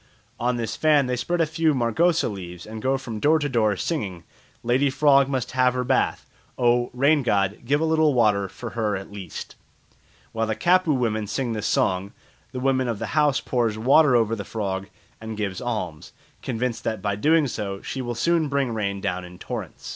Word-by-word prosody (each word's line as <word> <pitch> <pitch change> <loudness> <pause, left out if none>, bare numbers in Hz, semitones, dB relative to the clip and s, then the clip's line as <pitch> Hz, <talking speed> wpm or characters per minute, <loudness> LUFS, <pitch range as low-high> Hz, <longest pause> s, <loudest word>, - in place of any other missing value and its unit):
On 125 +1 +1
this 115 -2 -3
fan 150 -3 +3
they 125 0 -1
spread 175 +7 -1
a - - +4
few 155 -1 +1
margosa 160 +8 +2
leaves 90 -4 -7
and 110 0 -8
go 135 +2 +1
from 115 -5 -6
door 155 +7 +4
to 145 -2 -1
door 110 -6 +1
singing, 95 - -3 0.4
"Lady 130 +4 +2
frog 140 0 +4
must 130 -3 -2
have 125 -1 +2
her 125 - 0
bath. 130 +1 0 0.3
Oh! 120 0 +2
rain 140 +4 +3
god, 100 -5 0
give 145 +4 +2
a - - +2
little 160 -3 +3
water 105 -5 +2
for 115 +5 -8
her 110 -3 -1
at 95 +1 -9
least." 100 -3 -8 0.8
While 115 0 -1
the 110 - -1
Kapu 180 +6 +3
women 110 -6 0
sing 120 +3 -2
this 110 -1 -2
song, 95 +3 0 0.4
the 130 - -5
woman 130 -1 +1
of 115 -3 -2
the 115 +3 -5
house 150 -3 +3
pours 115 -4 0
water 135 +4 +5
over 115 -1 +2
the 100 - -5
frog 95 -3 -3 0.3
and 110 -1 -6
gives 100 -3 -3
an 125 - -5
alms, 90 -10 -4 0.3
convinced 125 -1 -3
that 110 -4 -3
by 100 -1 0
so 100 - -7
doing 160 0 +4 0.4
she 130 - -4
will 120 -1 -4
soon 165 +5 +1
bring 140 -4 0
rain 100 -3 -2
down 90 -1 -2
in 90 0 -11
torrents. - - -7
120 Hz, 200 wpm, -24 LUFS, 105-140 Hz, 0.8 s, water